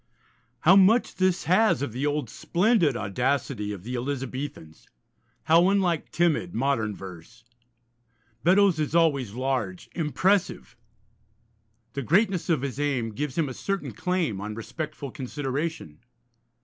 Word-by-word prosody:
How 180 +4 +6
much 200 +5 +4
this 185 -1 +1
has 185 - +3
of 140 - -3
the 130 +6 -2
old, 145 -3 -1
splendid 175 - +1
audacity 115 +1 -1
of 100 -3 -7
the 125 +4 -5
Elizabethans! 130 - -5 0.6
How 165 +3 +5
unlike 185 -5 +1
timid 175 0 +1
modern 115 -5 0
verse! 95 +5 -11 1.0
Beddoes 190 -1 +4
is 155 +1 -1
always 140 -10 +2
large, 125 -7 -3
impressive; 175 - 0 1.2
the 140 - -3
greatness 185 - +1
of 155 -5 +1
his 135 -1 -4
aim 130 -6 -1
gives 140 +6 -4
him 160 -3 +1
a 130 - -5
certain 195 +8 -3
claim 175 - -1
on 105 +1 -5
respectful 150 +4 -6
consideration. 135 - -4
145 Hz, 125 wpm, -26 LUFS, 120-175 Hz, 1.2 s, How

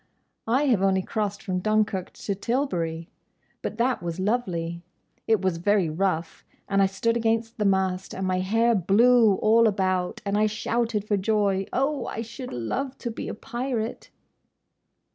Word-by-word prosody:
"I 255 +6 +2
have 245 -9 +2
only 190 -1 +2
crossed 205 -1 -3
from 185 -3 -1
Dunkerque 210 -2 0
to 200 - -3
Tilbury. 180 - -2 0.5
But 215 - -4
that 245 -1 +1
was 170 0 -4
lovely! 180 -6 -1 0.5
It 220 -4 +2
was 185 -3 +1
very 185 -2 +2
rough; 170 -1 -2 0.2
and 195 0 +2
I 195 - +5
stood 195 +4 0
against 225 0 0
the 210 - +1
mast, 190 -1 0
and 190 - -3
my 185 0 +1
hair 225 +5 +2
blew 220 +3 +5
all 225 +3 +4
about, 185 -3 0
and 200 +1 +1
I 215 - +4
shouted 220 0 -1
for 205 - +2
joy!—Oh! 210 +7 0
I 225 - -4
should 235 +3 -8
love 255 - -3
to 235 - -4
be 225 - -6
a - - -4
pirate!" 240 -2 -4
205 Hz, 160 wpm, -25 LUFS, 185-230 Hz, 0.5 s, I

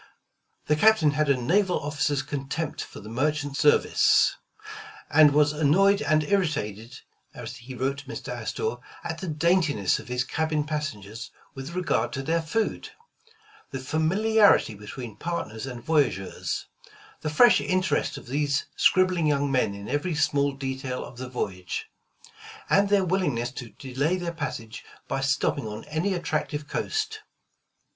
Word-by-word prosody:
The 150 - +2
Captain 170 -3 +5
had 150 0 0
a 140 - +4
naval 180 +9 +2
officer's 145 -1 -1
contempt 145 +3 -4
for - - -11
the 105 - -11
merchant 145 +4 -1
service, 145 +1 +4 0.8
and 155 -1 +7
was 150 0 +3
annoyed 185 +7 +4
and 155 0 +2
irritated, 145 - -2 0.3
as - - -7
he 125 +3 -10
wrote 135 +3 -2
Mr. - - -7
Astor, 445 +1 -3 0.3
at - - -4
the 190 - -5
daintiness 160 - +2
of - - -11
his 125 0 -1
cabin 155 +2 -1
pas 150 -1 -2
sengers 105 +2 -9 0.2
with 135 +6 -7
regard 185 -1 0
to 135 - -3
their 165 +4 +1
food; 215 +8 -2 0.8
the 135 - -5
familiarity 185 - +3
be 105 0 -12
tween 120 -4 -7
partners 135 -8 -4
and 120 -3 -7
voyageurs; 135 - 0 0.5
the 155 - -3
fresh 225 +11 +6
interest 185 0 0
of - - -10
these 140 +2 0
scribbling 185 -3 +3
young 145 -1 +1
men 125 -6 +1
in 100 0 -8
every 155 +3 -1
small 145 -2 +2
detail 130 -1 -4
of 120 - -12
the 130 0 -5
voyage; 110 - -4 0.8
and 200 +1 +4
their 200 -2 +3
willingness 145 -10 0
to 125 -3 -8
delay 140 +8 -2
their 175 -2 -4
passage 120 -8 -5 0.2
by 135 - -2
stopping 135 -2 0
on 105 +1 -6
any 170 +6 -1
attractive 155 -3 -2
coast. 435 - -2
145 Hz, 150 wpm, -26 LUFS, 130-170 Hz, 0.8 s, and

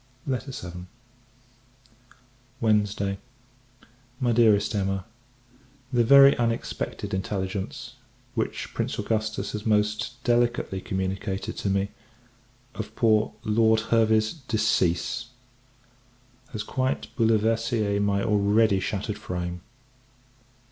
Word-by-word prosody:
VII. 105 -10 -5 1.7
Wednesday. 105 -3 +1 1.0
MY 125 -2 +1
DEAREST 110 -2 +4
EMMA, 95 -2 -1 0.9
The 120 -1 +4
very 140 +3 +8
unexpected 115 -4 -2
intelligence, 95 +4 -3 0.4
which 115 -3 -3
Prince - - -2
Augustus 110 -1 -2
has 105 -1 -5
most 105 +2 +1
delicately 120 -5 +1
communicated 95 0 -3
to 100 - -2
me, 100 +1 0 0.8
of 110 - -7
poor 110 -2 +3
Lord 110 +1 +3
Hervey's 110 -1 +3
decease, 110 - 0 1.2
has 110 -3 -4
quite 130 +4 -2
bouleversée 115 -2 +1
my 100 -1 +1
already 105 0 +3
shattered 105 +2 -3
frame. 90 -4 -4
110 Hz, 85 wpm, -26 LUFS, 100-115 Hz, 1.7 s, very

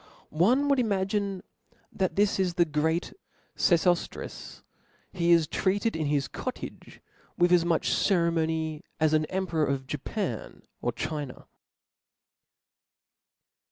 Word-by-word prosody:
One 240 - +3
would 280 -2 +3
imagine 200 -3 0 0.5
that 190 -2 0
Book: - - -21
this 205 -1 +2
is 180 -2 0
the 175 -2 +4
great 160 +2 -1 0.4
Sef(5ftris. 175 0 0 0.5
He 175 -2 +1
is 165 -2 +6
treated 200 +7 0
in 155 -2 -1
his 140 -3 +1
cw"L - - -9
cottage, - - -7 0.4
with 175 0 +3
as 175 -2 +5
much 170 -2 +1
ceremony 160 -4 +1 0.2
as 155 -1 +3
an 155 0 +3
emperor 170 -4 -1
of 135 -1 -2
Japan - - -4 0.2
or - - 0
China. 145 -4 -5
170 Hz, 120 wpm, -28 LUFS, 155-190 Hz, 0.5 s, is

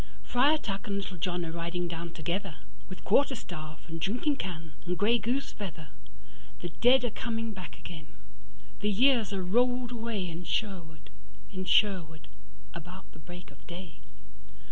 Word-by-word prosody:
Friar 280 +6 +5
Tuck 200 -8 -4
and 200 - 0
Little 195 -2 -3
John 175 +1 0
are 165 - -3
riding 170 +1 -2
down 170 0 -4
togetherWith 165 -1 -5
quarter 270 +6 +4
staff 155 - -7
and 165 0 -5
drinking 245 - +1
can 165 - -4
and 180 0 -1
grey 225 +5 +4
goose 260 +5 0
feather; 165 -7 -6 0.7
The 175 - -3
dead 245 +10 +5
are 240 - 0
coming 225 0 -2
back 185 -2 -8
again; 155 -3 -8 0.7
the 210 - +2
years 230 -1 +5
are 195 -2 -1
rolled 245 +5 +3
awayIn 205 -8 -2
Sherwood, 160 -5 -2 0.4
in 185 -1 -4
Sherwood, 165 -6 +3 0.5
about 180 +3 -9
the 160 - -14
break 175 +2 -10
of - - -18
day. 175 -2 -8
185 Hz, 150 wpm, -31 LUFS, 165-225 Hz, 0.7 s, Friar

